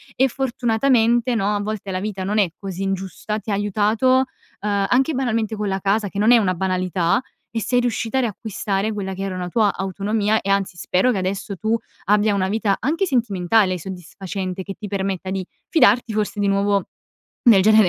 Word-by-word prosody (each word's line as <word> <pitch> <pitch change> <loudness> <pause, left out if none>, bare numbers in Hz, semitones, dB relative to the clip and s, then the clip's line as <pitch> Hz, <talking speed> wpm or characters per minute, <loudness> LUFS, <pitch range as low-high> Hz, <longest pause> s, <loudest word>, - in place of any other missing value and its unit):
e 265 - +4
fortunatamente 240 -1 +2
no, 205 0 +1
a - - 0
volte 205 -2 -4
la 185 - -2
vita 195 -2 -4
non 210 +3 -1
è 195 -5 +3
così 195 -1 -5
ingiusta, 195 +2 -3
ti 220 - -10
ha - - +1
aiutato, 210 +4 +1 0.5
uhm, 200 -1 +1
anche 265 +5 +3
banalmente 230 -5 -1
con 210 -1 -2
la 195 0 -1
casa, 205 +1 +1
che 200 - -5
non 220 +3 +5
è 240 - +8
una 195 -5 +2
banalità 185 0 0 0.3
e 230 - -2
sei 245 +2 +2
riuscita 240 +1 -1
a - - +3
riacquistare 210 -2 -2
quella 190 -2 -4
che 195 +1 -5
era 190 -1 -3
una 180 -1 -4
tua 210 0 +2
autonomia, 205 +3 0
e 200 - -4
anzi 195 -2 0
spero 185 +8 +2
che 205 - -1
adesso, 195 +2 -3
tu 220 +4 +1 0.3
abbia 210 +1 +3
una 190 -1 +1
vita 210 -2 +1
anche 330 +8 0
sentimentale 205 - +2
soddisfacente, 185 +1 -6
che 195 +1 -7
ti 210 - -7
permetta 190 -1 -3
di 190 -2 -2 0.2
fidarti 240 - +4
forse 210 -1 -1
di 200 - +2
nuovo, 200 0 +2 0.6
nel 210 -6 +7
genere 215 -2 +6
205 Hz, 195 wpm, -21 LUFS, 190-225 Hz, 0.6 s, è